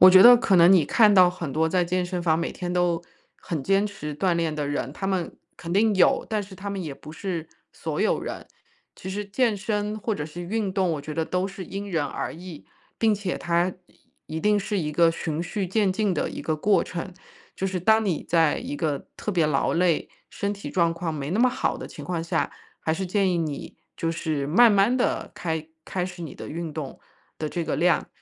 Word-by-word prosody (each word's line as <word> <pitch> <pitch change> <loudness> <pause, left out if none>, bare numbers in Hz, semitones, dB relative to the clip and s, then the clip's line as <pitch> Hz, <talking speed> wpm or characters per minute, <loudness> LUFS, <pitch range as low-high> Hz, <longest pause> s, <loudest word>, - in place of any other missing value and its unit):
我 185 +1 +10
觉 185 +3 +8
得 245 0 +11
可 195 -5 +2
能 170 +2 +7
你 175 -6 +5
看 210 +5 +5
到 180 -2 +7
很 170 -6 -5
多 160 +1 +2
在 180 0 +2
健 180 +1 0
身 175 0 -3
房 160 -2 +2
每 170 - -2
天 180 -1 -4
都 175 -2 +1 0.4
很 155 -5 -4
坚 195 +6 +2
持 150 -7 -6
锻 185 -1 +1
炼 165 -2 0
的 150 -1 -2
人， 140 -2 -2
他 195 - -4
们 185 -3 -2 0.2
肯 170 +1 -6
定 210 +1 +3
有， 185 - +3
但 215 -2 0
是 190 -1 -11
他 200 +2 -6
们 195 -1 -3
也 155 -4 -5
不 155 +3 -11
是 165 -2 -4 0.2
所 - - -4
有 - - +2
人。 - - -6 0.5
其 190 - -8
实 205 +2 -3
健 215 +1 +1
身 210 +1 -2
或 215 0 -2
者 150 - -4
是 175 +3 -8
运 200 +1 -2
动 185 -2 +1
我 150 - -3
觉 150 +1 -7
得 160 0 0
都 180 +2 -1
是 195 -1 -7
因 200 +3 -6
人 160 -5 0
而 - - -4
异， 170 -2 -10 0.3
并 220 -2 +3
且 200 -3 -3
它 175 +1 +1
一 160 - -13
一 - - -2
定 210 +2 +3
是 200 -1 -1
一 150 -1 -2
个 165 +2 +4
循 160 -1 -3
序 190 +3 -2
渐 190 +1 +1
进 205 -1 +1
的 155 - -1
一 - - -7
个 155 -1 -1
过 195 +2 +3
程。 175 +1 -6 0.4
就 - - -4
是 185 - -2
当 220 +5 +4
你 180 -6 -1
在 165 -3 +3
一 260 +4 -5
个 150 - -2
特 210 - -3
别 170 -5 +2
劳 140 -3 +1
累、 170 -2 +2 0.2
身 200 0 -2
体 200 - -7
状 170 -3 +2
况 165 -1 -3
没 145 0 -4
那 205 - 0
么 255 +1 +5
好 260 +1 -1
的 255 - -6
情 145 - -10
况 175 -2 -2
下， 165 - 0 0.3
还 160 - 0
是 185 +3 -2
建 195 0 +2
议 175 - +1
你 155 -4 -4 0.2
就 165 - -1
是 155 -4 -2
慢 230 +7 +6
慢 200 +5 +4
地 255 - 0
开 160 -2 -3 0.2
开 180 -2 -2
始 180 -1 -8
你 155 - -7
的 - - -8
运 165 0 -5
动 145 -4 -6 0.4
的 155 - -2
这 170 +1 -3
个 160 - -1
量。 175 +2 +2
180 Hz, 255 characters per minute, -25 LUFS, 160-200 Hz, 0.5 s, 得